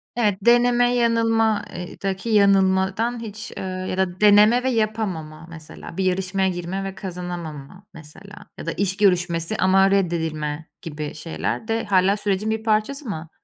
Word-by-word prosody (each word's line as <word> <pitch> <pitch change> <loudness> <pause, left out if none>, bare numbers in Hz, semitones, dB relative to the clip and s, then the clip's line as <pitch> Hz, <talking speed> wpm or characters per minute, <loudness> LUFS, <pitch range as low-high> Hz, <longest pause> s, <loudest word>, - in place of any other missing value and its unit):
Evet, 210 -5 +1
deneme 245 0 +4
yanılma 225 -2 +2
ııı, 180 0 -5 0.2
daki 195 +3 -3
yanılmadan 200 +3 +2
hiç, 220 0 -7
ııı, 185 0 -4
ya 185 - -3
da 185 0 -1
deneme 210 +4 +6
ve 260 - +1
yapamama, 205 -9 -2
mesela, 165 +1 -11
bir 190 - 0
yarışmaya 190 +1 0
girme 180 +2 -4
ve 195 0 -6
kazanamama, 175 -2 -7
mesela, 165 +6 -13
ya - - -7
da - - -2
iş 195 0 -2
görüşmesi 175 -1 +1
ama 190 +1 +4
reddedilme 160 -5 -1
gibi 150 -2 -6
şeyler 165 +7 -4
de 225 0 -1
hâlâ 195 0 +3
sürecin 205 +1 -1
bir 220 0 -2
parçası 225 +6 0
mı? 160 -3 -6
195 Hz, 150 wpm, -22 LUFS, 175-220 Hz, 0.2 s, deneme